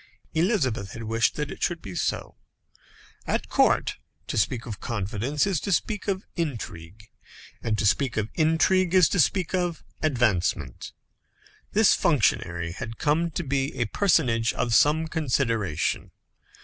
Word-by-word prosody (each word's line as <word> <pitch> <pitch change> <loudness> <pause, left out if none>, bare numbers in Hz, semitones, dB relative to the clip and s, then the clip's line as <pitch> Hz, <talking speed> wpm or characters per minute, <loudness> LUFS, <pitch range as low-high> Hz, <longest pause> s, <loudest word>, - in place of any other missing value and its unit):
Elizabeth 145 - 0
had 115 - -7
wished 115 -1 +1
that 150 -1 -3
it - - -9
should 175 -1 0
be 95 - -9
so. - - -2 0.9
At - - -1
court, - - +2 0.3
to - - -4
speak 115 +4 0
of 110 -4 -6
confidence 115 +6 -1
is 195 -6 0
to 200 - -3
speak 210 +3 -1
of 195 0 -1
intrigue, 105 - -5 0.5
and 110 -2 -1
to 105 - 0
speak 120 +5 +1
of 110 0 -1
intrigue 170 +3 +2
is 180 -4 +7
to 190 - 0
speak 180 +5 +2
of 175 -3 -1 0.2
advancement. 100 - 0 0.8
This - - +5
functionary 85 -1 +1
had 115 +5 -7
come 160 +3 +1
to 165 - -4
be 140 0 -1
a 120 - +2
personage 115 - +2
of 120 - -1
some 155 +7 +4
consideration. 120 - -1
130 Hz, 145 wpm, -26 LUFS, 110-165 Hz, 0.9 s, is